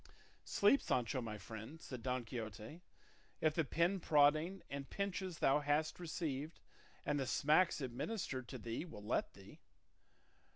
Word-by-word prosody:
"Sleep, 210 +8 +4
Sancho 125 +1 0
my 110 -2 -4
friend," 110 +9 -8
said 130 -5 -7
Don 125 0 -1
Quixote, 110 - -6 0.6
"if 155 -1 +3
the 160 - +2
pinprodding 165 +1 +3
and 140 -1 -5
pinches 190 -3 -2
thou 135 +2 +4
hast 150 +3 +1
received 155 -3 -3 0.5
and 145 -1 +1
the 135 - -1
smacks 155 +5 +3
administered 130 - -3
to 130 - -6
thee 115 +4 -4
will 155 -12 -9
let 105 - 0
thee." - - -14
145 Hz, 135 wpm, -38 LUFS, 125-165 Hz, 0.6 s, Sleep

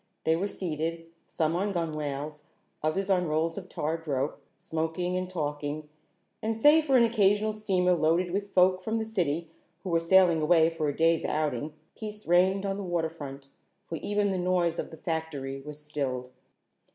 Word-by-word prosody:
They 160 - +3
were 190 +5 -1
seated, 165 -3 -3 0.2
some 160 0 0
on 200 +3 0
gunwales, 150 -3 -3 0.4
others 170 +6 0
on 180 -2 +2
rolls 160 +2 0
of 190 -2 -7
tarred 160 +2 -3
rope, 140 0 -1 0.2
smoking 165 +3 -2
and 185 0 -2
talking, 150 -2 -3 0.5
and 220 0 -1
save 300 +6 +6
for 270 -3 +4
an 240 - +6
occasional 215 -2 +3
steamer 190 -4 +2
loaded 170 +2 +2
with 200 +2 -2
folk 185 0 +4
from 220 +4 -1
the 220 - -1
city 170 -6 -1 0.3
who 185 - -4
were 165 - +4
sailing 170 -1 +5
away 160 +1 +4
for 155 -2 -1
a 145 - -4
day's 165 0 +3
outing, 150 -1 -1 0.2
peace 215 -1 -7
reigned 185 +3 +3
on 195 0 -1
the 200 - -4
waterfront, 160 -6 -3 0.4
for 165 - -5
even 205 +3 0
the 185 - -1
noise 175 -2 +1
of - - -3
the 160 - -11
factory 150 -5 -4
was 150 +1 -8
stilled. 135 -4 -4
165 Hz, 175 wpm, -28 LUFS, 155-190 Hz, 0.5 s, save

